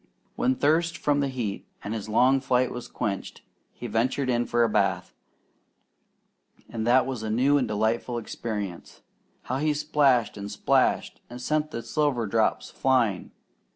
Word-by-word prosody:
When 130 +1 +1
thirst 165 +5 +1
from 145 -1 +1
the 140 - +1
heat 120 -7 -4 0.2
and 105 - -4
his 110 -1 -5
long 130 +5 +4
flight 130 -1 +1
was 125 - -6
quenched, 100 -2 -4 0.3
he - - -10
ventured 125 +4 0
in 120 0 0
for 120 0 +2
a - - +4
bath, 95 -4 0 1.5
and 115 -1 -4
that 130 +2 +5
was 130 -4 -4
a 110 - -4
new 135 +6 +3
and 125 - -1
delightful 110 +3 -1
experience. 105 -5 -6 0.4
How 130 - -2
he 150 0 +1
splashed 145 -5 +2
and 100 0 -6
splashed, 100 - +1
and 120 +1 -8
sent 150 +4 -1
the 115 -6 -6
silver 145 -7 0
drops 110 +2 0
flying! 120 -8 +1
120 Hz, 155 wpm, -26 LUFS, 110-135 Hz, 1.5 s, that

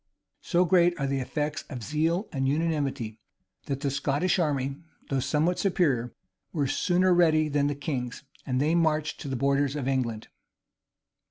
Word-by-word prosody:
So 180 0 +2
great 175 -1 +3
are 140 - 0
the 135 0 0
effects 145 +3 -2
of 125 -5 -6
zeal 165 - 0
and 135 -2 0
unanimity, 140 -7 -1 0.5
that 140 0 -3
the 140 -2 0
Scottish 145 +7 +1
army, 140 -4 0 0.3
though 135 - +2
somewhat 155 +7 +1
superior, 145 - +1 0.4
were 150 -5 0
sooner 180 +6 +2
ready 160 -3 +4
than 145 0 +1
the 145 - -1
king's; 135 -3 -4 0.2
and 125 -1 -1
they 150 +4 +2
marched 155 -2 +1
to - - -6
the 135 - -2
borders 140 +2 +1
of 140 -3 -3
England. 120 -5 -1
145 Hz, 160 wpm, -27 LUFS, 135-165 Hz, 0.5 s, ready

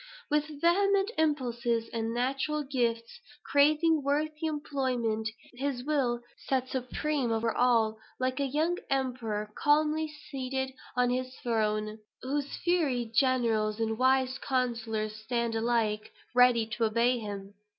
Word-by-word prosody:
With 300 0 +2
vehement 395 +5 +3
impulses 240 -6 0
and 225 0 -1
natural 270 +5 -1
gifts, 240 - -1 0.3
craving 305 +2 +4
worthy 300 +3 -1
employment, 255 -7 -1 0.2
his 255 0 -3
will 260 -5 0 0.3
sat 260 -1 +1
supreme 260 +1 -1
over 225 0 0
all, 225 -3 +3 0.2
like 255 +1 -1
a 280 - +1
young 315 +6 0
emperor 240 -6 -1
calmly 305 +1 +2 0.2
seated 265 -1 -2 0.2
on 250 0 +3
his 255 +1 -2
throne, 215 -2 0 0.2
whose 280 +2 -1 0.2
fiery 275 -10 +1
generals 230 -4 +2
and 225 0 0
wise 260 +1 +2
counsellors 230 -4 -1
stand 235 +1 -1
alike 225 -2 0 0.2
ready 245 -2 +5
to 225 +1 -1
obey 235 +3 +2
him. 200 -2 -6
250 Hz, 120 wpm, -30 LUFS, 230-285 Hz, 0.3 s, ready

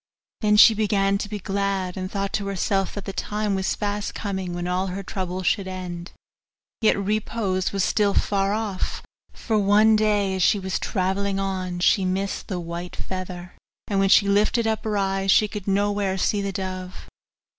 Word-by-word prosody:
Then 210 -1 +3
she 225 - +9
began 200 -2 +1
to 205 - -4
be 210 - -3
glad, 195 -2 -2
and 185 -1 -4
thought 200 0 -3
to 200 -1 -1
herself 195 0 -1
that 205 - -6
the 195 - -5
time 210 +1 -2
was 190 0 0
fast 205 0 -3
coming 190 -4 -3
when 175 0 -3
all 180 +2 0
her 190 +2 -5
troubles 185 -1 -4
should 195 0 +1
end; 180 -2 -6 0.7
yet 220 - +4
repose 200 -2 -1
was 195 -2 0
still 205 0 +2
far 195 -1 +1
off, 210 -3 -3 0.3
for 220 -3 -1
one 210 +2 +5
day 210 -2 +2
as 190 - -2
she 210 - +4
was 190 -1 -2
travelling 195 0 -1
on 185 -2 -2
she 190 +2 +4
missed 190 +2 -2
the 185 -3 -3
white 170 +1 -6
feather, 180 -1 -6 0.3
and 200 -2 0
when 195 0 +3
she 200 +1 +6
lifted 210 +3 +2
up 220 -1 -1
her 210 -1 0
eyes 195 0 0
she 210 +2 +5
could 205 -2 -7
nowhere 200 -1 +1
see 205 +2 +1
the 200 0 -2
dove. 185 -1 -6
195 Hz, 185 wpm, -24 LUFS, 185-205 Hz, 0.7 s, she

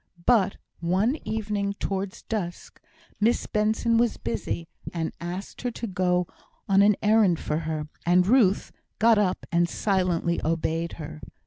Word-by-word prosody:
But 215 -6 +3 0.2
one 190 - +1
evening 210 -2 -1
towards 195 -1 -4
dusk, 185 -6 -5 0.4
Miss 225 +3 +2
Benson 220 +2 +1
was 235 -1 +2
busy, 115 +9 -3 0.2
and 165 -2 -3
asked 180 +3 -6
her 245 - -1
to 235 - -5
go 180 -3 +1 0.4
an 200 +1 +5
errand 210 -5 +4
for 150 +1 -1
her; 155 -1 -3 0.2
and 180 +1 +4
Ruth 210 -3 +3 0.3
got 225 -1 +5
up 185 -3 0
and 170 0 +2
silently 180 -4 0
obeyed 165 +1 -1
her. 155 -1 -8
190 Hz, 135 wpm, -26 LUFS, 170-215 Hz, 0.4 s, an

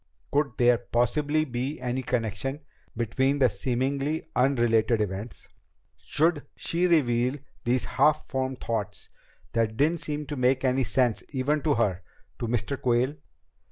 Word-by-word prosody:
Could 145 0 +1
there 120 -2 +4
possibly 145 +6 +1
be 130 +3 -3
any 125 +1 -2
connection 125 - -2 0.4
between 130 +5 +1
the 130 -3 +4
seemingly 135 +8 -1
unrelated 120 -3 +3
events? 105 +2 -4 0.5
Should 160 -1 0
she 175 +2 0
reveal 125 -6 +2 0.3
these 120 -2 +1
half 155 +8 +2
formed 130 -1 -2
thoughts 105 -3 -4 0.4
that 110 -1 0
didn't 160 +4 +2
seem 150 0 -3
to 145 - -5
make 130 +1 +2
any 130 0 +2
sense 120 0 +1
even 145 +2 0
to 150 -2 +2
her 100 -6 +1 0.4
to 120 - -2
Mr. 120 +4 -2
Quayle? 125 +2 +2
130 Hz, 135 wpm, -27 LUFS, 120-145 Hz, 0.5 s, there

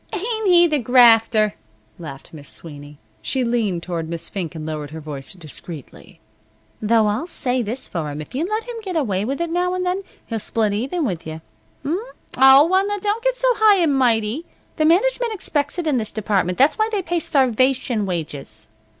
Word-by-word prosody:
"Ain't 440 +2 -2
he 350 -1 +6
the 305 -3 +1
grafter!" 225 -3 +5 0.5
laughed 145 -4 -10
Miss 145 -3 -9
Sweeney. 145 -2 -10 0.2
She 260 -1 -1
leaned 220 -8 -1
toward 165 -3 -4
Miss 170 -1 -3
Fink 180 -4 -5
and 155 -1 -6
lowered 155 -2 -5
her 160 - -8
voice 145 -3 -7
discreetly. 160 -3 -8 0.6
"Though 220 0 +3
I'll 210 +11 -1
say 255 -7 -1
this 235 +4 -2
for'm. 150 -3 -4
If 155 - -9
you 275 +5 -1
let 430 +4 -2
him 485 0 -7
get 380 -4 -5
away 210 - 0
with 275 +5 -3
it 340 -1 -2
now 360 +1 0
an' 365 - -2
then, 365 +2 -1 0.2
he'll 225 -2 -3
split 215 0 0
even 270 - -1
with 175 -8 -4
you. 160 0 -7 0.4
H'm? 325 +6 0 0.4
O, 265 +2 +7
well, 380 +3 +2
now, 410 0 -2
don't 415 +3 -2
get - - +1
so - - -2
high 430 -2 +6
and 330 -6 +2
mighty. 240 +3 +1 0.3
The 310 - +2
management 465 +8 +2
expects 295 -6 -1
it 350 - -2
in 295 -4 +1
this 220 -3 -1
department. 195 -4 -1
That's 280 +10 +3
why 435 +1 +2
they 405 -3 -1
pay 345 0 -1
starvation 255 -5 +1
wages." 145 - -4
245 Hz, 195 wpm, -21 LUFS, -, 0.6 s, O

